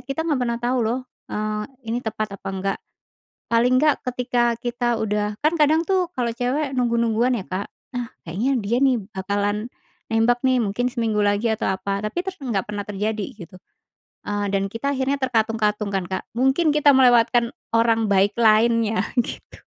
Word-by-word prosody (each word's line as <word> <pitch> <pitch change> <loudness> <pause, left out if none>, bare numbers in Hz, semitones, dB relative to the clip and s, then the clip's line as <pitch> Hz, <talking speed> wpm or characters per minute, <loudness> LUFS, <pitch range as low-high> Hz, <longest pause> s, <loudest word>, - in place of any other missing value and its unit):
kita 275 +4 -2
nggak 295 -5 +1
pernah 235 -1 -1
tahu 250 +1 0
loh, 240 +4 -1 0.3
eee, 210 0 -2 0.2
ini 230 +2 0
tepat 215 -2 -3
apa - - -7
enggak." 195 +1 -2 0.7
Paling 235 +2 +3
enggak 300 -1 +4
ketika 245 -1 0
kita 240 0 -2
udah 210 -1 -1
kan 305 - +4
kadang 315 +3 +4
tuh 375 -2 +1
kalau 240 -2 0
cewek 265 +4 -1
nunggu-nungguan 235 0 +2
ya, 190 - -6
Kak, 185 +2 -4 0.3
"Ah, 245 -1 -3 0.2
kayaknya 225 +12 0
dia 225 +4 0
nih 265 -2 +4 0.2
bakalan 205 +3 -1 0.4
nembak 230 +2 +3
nih 260 -1 +4
mungkin 225 +4 0
seminggu 225 -3 0
lagi, 205 +3 +1
atau 220 - -1
apa," 195 +1 -2
tapi 215 +11 -2
ter 385 - -2
nggak 235 - -2
pernah 205 -1 -4
terjadi 210 +1 -2
gitu. 185 -2 -11 0.7
Eee, 205 0 -1
dan 195 0 +1
kita 230 +6 -2
akhirnya 265 +1 0
terkatung-katung 220 -4 0
kan, 190 - 0
Kak? 190 - -3
Mungkin 265 +7 +2
kita 295 -1 +5
melewatkan 240 -2 +4 0.2
orang 230 -1 +3
baik 200 +1 +3
lainnya 225 0 +4 0.2
gitu. - - -9
230 Hz, 165 wpm, -22 LUFS, 210-250 Hz, 0.7 s, kita